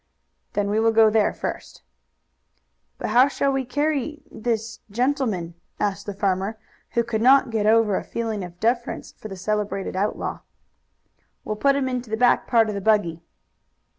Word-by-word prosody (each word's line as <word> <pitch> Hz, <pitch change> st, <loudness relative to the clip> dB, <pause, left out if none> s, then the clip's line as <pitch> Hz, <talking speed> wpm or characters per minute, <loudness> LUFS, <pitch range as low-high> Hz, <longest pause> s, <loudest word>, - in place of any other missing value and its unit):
"Then 205 Hz, 0 st, 0 dB
we 215 Hz, -, +2 dB
will 225 Hz, 0 st, +4 dB
go 220 Hz, -1 st, +5 dB
there 215 Hz, -1 st, +3 dB
first." -, -, -6 dB, 1.1 s
"But -, -, -3 dB
how 250 Hz, +4 st, +6 dB
shall 280 Hz, 0 st, 0 dB
we 270 Hz, -1 st, -1 dB
carry 295 Hz, +2 st, -1 dB
this 230 Hz, 0 st, -3 dB
gentleman?" 225 Hz, -7 st, -1 dB, 0.3 s
asked 200 Hz, 0 st, -2 dB
the 205 Hz, -, -3 dB
farmer, 195 Hz, +2 st, -1 dB, 0.4 s
who 235 Hz, 0 st, +2 dB
could 225 Hz, -2 st, -2 dB
not 260 Hz, 0 st, +5 dB
get 215 Hz, -2 st, 0 dB
over 220 Hz, -2 st, +4 dB
a -, -, -1 dB
feeling 225 Hz, -4 st, -3 dB
of 175 Hz, 0 st, -10 dB
deference 235 Hz, +1 st, -1 dB
for -, -, -10 dB
the 195 Hz, -2 st, -8 dB
celebrated 205 Hz, -1 st, -2 dB
outlaw. 200 Hz, +3 st, -2 dB, 1.0 s
"We'll 215 Hz, -, -3 dB
put 275 Hz, +6 st, +3 dB
him 275 Hz, -2 st, 0 dB
into 250 Hz, -2 st, -3 dB
the 220 Hz, -, -1 dB
back 245 Hz, +1 st, +3 dB
part 230 Hz, -2 st, +4 dB
of 210 Hz, -, -2 dB
the 200 Hz, -, -4 dB
buggy." 190 Hz, -6 st, +2 dB
220 Hz, 165 wpm, -23 LUFS, 205-245 Hz, 1.1 s, how